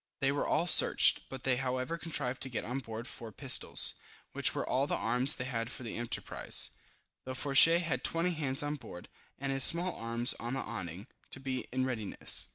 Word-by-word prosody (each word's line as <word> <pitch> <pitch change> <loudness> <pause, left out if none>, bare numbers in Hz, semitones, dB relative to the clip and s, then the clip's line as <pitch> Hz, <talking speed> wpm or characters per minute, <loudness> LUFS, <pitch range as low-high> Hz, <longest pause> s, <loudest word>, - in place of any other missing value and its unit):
They 135 -1 +1
were 145 - -2
all 170 - +1
searched, 175 - +5
but 130 -1 -9
they 130 -2 +1
however 130 +4 -2
contrived 145 -7 -4
to 130 - -4
get 120 - -4
on 125 +5 -3
board 115 -1 -7
four 115 -2 -6
pistols, 130 +4 +6 0.4
which - - 0
were - - -3
all 135 +2 0
the - - -1
arms 125 +5 +2
they 125 - -4
had 115 -1 -4
for 130 - -7
the 115 - -6
enterprise, 120 0 0 0.5
though 130 0 -6
Fourgette 150 +6 +4
had 150 -7 -3
20 170 +2 0
hands 145 -4 -1
on 145 +1 -3
board, 90 -9 -11 0.3
and 135 0 -3
his 135 -1 +1
small 175 +4 +3
arms 115 +1 -1
on 120 +3 -4
the - - -3
awning, 95 -4 -7 0.2
to - - -6
be 130 -1 -4
in 130 +1 -1
readiness. 110 -6 -2
130 Hz, 200 wpm, -31 LUFS, 120-140 Hz, 0.5 s, pistols